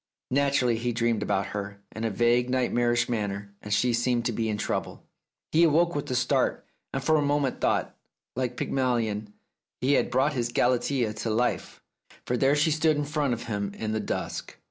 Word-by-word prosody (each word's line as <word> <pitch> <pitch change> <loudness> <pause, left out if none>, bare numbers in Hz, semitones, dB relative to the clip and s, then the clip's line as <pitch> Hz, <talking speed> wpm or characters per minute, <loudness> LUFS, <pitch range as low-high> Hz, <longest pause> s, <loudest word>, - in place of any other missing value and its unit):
Naturally, 135 -3 +2
he 120 +1 -1
dreamed 115 -2 +1
about 100 -2 0
her, 100 0 -5 0.2
in 110 - -4
a - - +1
vague 120 +3 +2
nightmarish 120 -1 +1
manner, 100 -3 -3
and 105 - -8
she 120 +4 +2
seemed 120 0 +1
to 120 - +1
be 110 0 -1
in 105 - -1
trouble. - - -3 0.5
He 160 - +4
awoke 170 +2 +4
with 145 - -3
a 125 - -1
start, 125 +1 +1 0.3
and 135 - -3
for 155 +2 +4
a - - +2
moment 145 -2 0
thought - - +1
that, - - -32 0.4
like 125 -1 -2
Pygmalion, 115 -5 -1 0.5
he 135 +3 +2
had - - +2
brought 135 +4 +2
his 120 -3 -1
Galatea 125 -1 +1
to 110 +2 -4
life, 120 +3 -1 0.4
for 125 - 0
there 135 +3 +3
she 150 +2 +3
stood 155 0 +2
in 145 - -1
front 145 -4 0
of 115 - -8
him 100 -3 -3
in 110 -1 -3
the 110 - 0
dusk. - - -4
120 Hz, 195 wpm, -27 LUFS, 110-135 Hz, 0.5 s, He